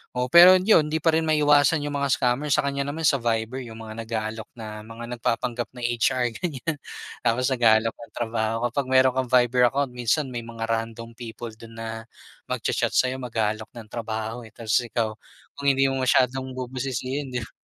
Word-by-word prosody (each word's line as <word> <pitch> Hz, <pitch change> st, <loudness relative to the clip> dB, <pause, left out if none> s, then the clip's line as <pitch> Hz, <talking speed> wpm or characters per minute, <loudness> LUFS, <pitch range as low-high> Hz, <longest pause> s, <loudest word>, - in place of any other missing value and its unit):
oo 125 Hz, 0 st, -1 dB
pero 175 Hz, +2 st, +10 dB
yun 185 Hz, -4 st, +4 dB
hindi 155 Hz, 0 st, -2 dB
pa 165 Hz, -, +5 dB
rin 160 Hz, 0 st, +1 dB
maiwasan 150 Hz, 0 st, +4 dB
yung 145 Hz, -1 st, -2 dB
mga 140 Hz, -, +1 dB
scammer, 125 Hz, +4 st, 0 dB
sa 145 Hz, -, +2 dB
kanya 140 Hz, 0 st, -2 dB
naman 160 Hz, +3 st, -4 dB
sa 140 Hz, -3 st, +3 dB
Viber 115 Hz, +1 st, -1 dB
yung 115 Hz, 0 st, -9 dB
mga 110 Hz, +1 st, -8 dB
nag-aalok 110 Hz, 0 st, -4 dB
na 110 Hz, -2 st, -7 dB
mga 115 Hz, +2 st, -9 dB
nagpapanggap 120 Hz, +1 st, -1 dB
na 125 Hz, -, -8 dB
HR 120 Hz, +1 st, +1 dB
ganyan. 160 Hz, -1 st, -3 dB, 0.4 s
Tapos 125 Hz, +3 st, +1 dB
nag-aalok 115 Hz, -3 st, +4 dB
ng 115 Hz, -, -14 dB
trabaho 115 Hz, -1 st, -1 dB, 0.2 s
kapag 140 Hz, +2 st, -1 dB
meron 130 Hz, 0 st, +5 dB
kang 130 Hz, -1 st, 0 dB
Viber 125 Hz, 0 st, +4 dB
account 135 Hz, +1 st, -1 dB
minsan 125 Hz, +3 st, 0 dB
may 120 Hz, -, -3 dB
mga 115 Hz, -1 st, -7 dB
random 115 Hz, +1 st, -3 dB
people 115 Hz, 0 st, -7 dB
dun 115 Hz, 0 st, -12 dB
na 115 Hz, 0 st, -6 dB, 0.4 s
mag-cha-chat -, -, -1 dB
sayo, 130 Hz, +1 st, +2 dB
mag-aalok 110 Hz, -3 st, -2 dB
ng 115 Hz, -2 st, -9 dB
trabaho 110 Hz, 0 st, -4 dB
eh -, -, -18 dB
tapos 115 Hz, 0 st, +1 dB
ikaw, 115 Hz, -2 st, -1 dB, 0.5 s
kung 140 Hz, -, -2 dB
hindi 135 Hz, 0 st, +4 dB
mo 135 Hz, -, -2 dB
masyadong 130 Hz, 0 st, +2 dB
bubusisihin 130 Hz, +1 st, -4 dB
di -, -, +1 dB
ba, -, -, -12 dB
125 Hz, 185 wpm, -25 LUFS, 115-135 Hz, 0.5 s, pero